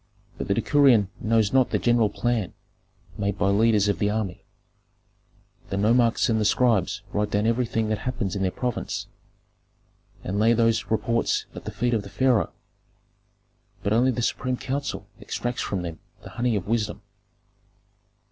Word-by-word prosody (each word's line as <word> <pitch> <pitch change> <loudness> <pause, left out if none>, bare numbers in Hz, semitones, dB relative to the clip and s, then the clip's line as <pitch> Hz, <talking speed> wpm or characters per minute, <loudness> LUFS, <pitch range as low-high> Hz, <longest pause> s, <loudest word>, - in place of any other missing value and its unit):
But - - -3
the 100 - +1
decurion 120 -5 +4
knows 110 -1 +1
not 130 -2 +4
the - - +1
general 120 -3 +2
plan 120 -5 -1 0.6
made 100 -1 -1
by 100 0 +2
leaders 105 0 +3
of 100 - 0
the 105 - +1
army. 105 -4 -3 1.3
The 100 - -2
nomarchs 115 +3 +3
and 110 -2 +1
the - - +2
scribes 105 -3 +2
write 105 0 0
down 105 +1 0
everything 115 -1 0
that 110 -1 -1
happens 105 -6 -3
in 100 - -2
their 95 - +2
province, 125 +5 -3 1.2
and 100 +3 -2
lay 115 +2 +4
those 115 -1 +2
reports 115 +2 0
at - - -9
the - - -4
feet 120 +2 -1
of 110 - +1
the - - -10
pharaoh. 130 -5 +2 1.3
But 100 - +1
only 120 +3 +4
the 120 -2 -1
supreme 125 +2 -1
council 135 -7 -4
extracts 120 0 -3
from 95 -3 -2
them 85 -2 -6 0.2
the - - -10
honey 120 0 0
of 95 -4 -2
wisdom." 105 -2 -1
110 Hz, 160 wpm, -25 LUFS, 100-120 Hz, 1.3 s, decurion